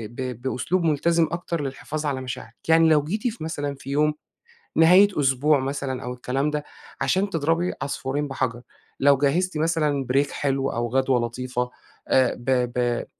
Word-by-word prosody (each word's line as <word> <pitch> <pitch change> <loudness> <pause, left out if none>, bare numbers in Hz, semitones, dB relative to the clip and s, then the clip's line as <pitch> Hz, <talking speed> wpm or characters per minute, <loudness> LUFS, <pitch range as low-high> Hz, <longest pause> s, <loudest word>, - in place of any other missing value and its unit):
ب 125 -2 -5
بأسلوب 135 +8 -1
ملتزم 165 +1 +2
اكتر 170 -2 -3
للحفاظ 150 +3 -4
على 135 -3 -1
مشاعرِك، 125 -3 -7
يعني 160 0 +6
لو 150 -2 +4
جيتِ 210 +10 -2
في 230 -6 -4
مثلًا 145 -3 -3
في 135 0 -11
يوم 150 +2 +2 0.6
نهاية 180 +5 +7
أسبوع 140 +2 +3
مثلًا 135 -1 -3
أو 125 +1 -4
الكلام 130 +3 -1
ده، 150 -1 -2 0.4
عشان 195 +2 +1
تضربي 165 +1 0
عصفورين 140 +1 -2
بحجر، 130 -3 -2 0.4
لو 140 0 +5
جهّزتي 155 +5 +1
مثلًا 150 -4 0
break 140 +1 +2
حلو 135 -1 -1
أو 120 0 -2
غدوة 130 0 +2
لطيفة، 125 +1 -3 0.4
آآ 130 -2 +3
ب 120 - -13 0.3
ب 120 -1 0
140 Hz, 160 wpm, -24 LUFS, 130-160 Hz, 0.6 s, نهاية